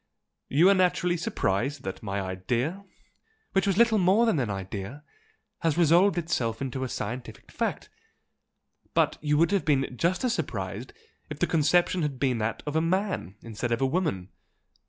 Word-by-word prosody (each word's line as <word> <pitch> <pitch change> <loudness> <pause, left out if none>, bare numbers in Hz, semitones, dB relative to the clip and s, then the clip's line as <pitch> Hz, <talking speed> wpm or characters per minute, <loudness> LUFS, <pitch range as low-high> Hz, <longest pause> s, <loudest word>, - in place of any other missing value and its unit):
You 160 +7 +5
are - - +7
naturally 180 -2 +2
surprised 140 - -1
that 95 - -5
my 100 -2 -3
'idea' 120 - -2 0.7
which 195 0 +1
was 195 -2 +1
little 230 -2 +4
more 190 +6 +4
than 220 -10 +2
an 120 -4 -1
idea, 100 +7 -6 0.6
has 165 -2 0
resolved 175 +3 +4
itself 125 -10 -1
into 130 -1 -3
a 130 - -3
scientific 120 +3 -6
fact - - -2 1.1
but - - +2
you 150 -1 +1
would 165 +1 +3
have 200 -2 +1
been 135 -4 +1
just 175 - 0
as 250 -2 +2
surprised - - -4 0.4
if - - -6
the - - +2
conception 175 +3 +2
had 145 -4 -2
been 125 -3 0
that 110 +1 -2
of 150 0 -4
a 160 - +3
man 185 - -1
instead 115 +1 -4
of 115 - +1
a 135 - +2
woman. 130 - -1
150 Hz, 170 wpm, -27 LUFS, 115-180 Hz, 1.1 s, are